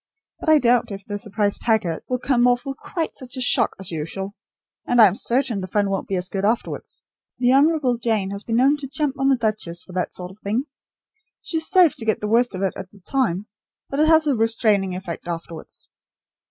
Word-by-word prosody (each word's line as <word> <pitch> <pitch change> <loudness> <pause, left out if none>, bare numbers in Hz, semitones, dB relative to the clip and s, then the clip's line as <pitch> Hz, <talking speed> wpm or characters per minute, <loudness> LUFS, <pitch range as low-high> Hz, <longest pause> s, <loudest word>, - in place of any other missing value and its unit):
But - - -2
I 310 - +7
doubt 245 -3 +3
if 195 0 -7
the 205 -1 -4
'surprise 205 0 -1
packet' 215 -8 0
will 250 - +1
come 250 -1 +2
off 245 +2 +2
with 270 0 -4
quite 330 -3 -4
such 260 0 -9
a - - -3
shock 245 -2 +3
as 190 -2 -5
usual, 180 +5 -4 0.5
and 245 - +2
I 220 - +10
am 190 - +4
certain 235 -1 0
the 185 - -5
fun 200 +1 0
won't 195 - -2
be 190 -2 -1
so 180 - -4
good 195 -1 -2
afterwards. 225 +3 -2 0.3
The 250 +1 +3
Honourable 280 -3 +3
Jane 220 -5 0
has 200 +1 -3
been 225 - -2
known 270 +5 +4
to 285 -2 -7
jump 280 0 -2
on 270 - +2
the 270 -1 +4
duchess 215 -7 -2
for 185 - -13
that 180 0 -1
sort 180 0 -7
of 195 - -17
thing. 215 +5 -1 0.8
She 330 - -2
is 320 - +1
safe 360 -5 +5
to 230 - -4
get 220 - +1
the 210 - -3
worst 235 0 +2
of 185 - -3
it 195 - 0
at 185 - -8
the 200 - -19
time, 210 -5 -1 0.5
but 275 - -2
it 310 - +4
has 320 -1 +5
a 290 - +2
restraining 220 -5 +1
effect 180 -2 -6
afterwards." 165 -1 -6
225 Hz, 230 wpm, -22 LUFS, 195-260 Hz, 0.8 s, I